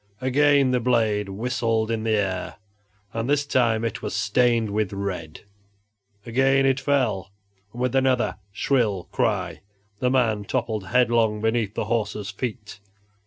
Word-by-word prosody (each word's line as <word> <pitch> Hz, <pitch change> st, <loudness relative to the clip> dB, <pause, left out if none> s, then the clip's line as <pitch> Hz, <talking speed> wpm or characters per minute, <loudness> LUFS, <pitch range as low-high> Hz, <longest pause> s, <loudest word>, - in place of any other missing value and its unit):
Again 140 Hz, +1 st, +3 dB
the 125 Hz, -, +2 dB
blade 110 Hz, -4 st, +1 dB
whistled 115 Hz, +1 st, -1 dB
in 115 Hz, -1 st, -1 dB
the 110 Hz, -1 st, +1 dB
air, 95 Hz, -3 st, -2 dB, 0.6 s
and 115 Hz, +3 st, -2 dB
this 145 Hz, 0 st, +2 dB
time 115 Hz, -5 st, +1 dB
it 115 Hz, -, -3 dB
was -, -, -4 dB
stained 115 Hz, +1 st, +2 dB
with 105 Hz, -2 st, -1 dB
red. 95 Hz, -6 st, -5 dB, 0.8 s
Again 135 Hz, +3 st, +3 dB
it 135 Hz, 0 st, +2 dB
fell, 125 Hz, -10 st, 0 dB, 0.4 s
and 120 Hz, +2 st, -4 dB
with 125 Hz, -1 st, 0 dB
another 130 Hz, -7 st, +2 dB
shrill 105 Hz, -4 st, 0 dB
cry -, -, -1 dB, 0.4 s
the 125 Hz, -, +1 dB
man 115 Hz, -5 st, +1 dB
toppled 110 Hz, -5 st, -2 dB
headlong 115 Hz, -2 st, +2 dB
beneath 110 Hz, -1 st, 0 dB
the -, -, -2 dB
horse's 105 Hz, -2 st, -2 dB
feet. 110 Hz, -1 st, -6 dB
115 Hz, 140 wpm, -24 LUFS, 105-125 Hz, 0.8 s, Again